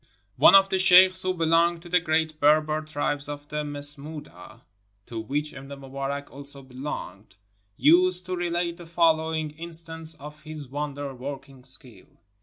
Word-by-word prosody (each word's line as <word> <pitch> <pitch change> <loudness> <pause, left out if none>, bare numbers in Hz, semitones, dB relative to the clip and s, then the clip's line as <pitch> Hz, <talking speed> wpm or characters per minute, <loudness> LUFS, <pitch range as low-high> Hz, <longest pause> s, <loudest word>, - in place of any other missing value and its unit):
One 195 - +8
of 195 0 +6
the 190 - 0
sheikhs 185 0 +7
who 185 0 -1
belonged 165 0 +2
to 175 - -11
the 180 +1 +4
great 160 -2 -1
Berber 155 +1 +3
tribe 145 -1 -2
of 145 0 -7
the 150 0 -3
Masmoodah, 145 -4 -6 0.4
to 115 - -6
which 145 +7 -3
Ibn 135 +1 -10
Mubarak 140 +1 -5
also 140 0 -7
belonged, 125 -7 -8 0.4
used 180 +3 +5
to 185 0 -3
relate 175 -1 -2
the 175 -2 -12
following 160 -2 +1
instance 165 0 -3
of 150 0 -11
his 155 -3 -8
wonder 145 0 -5
working 135 0 -9
skill. 130 -2 -7
150 Hz, 150 wpm, -25 LUFS, 140-170 Hz, 0.4 s, One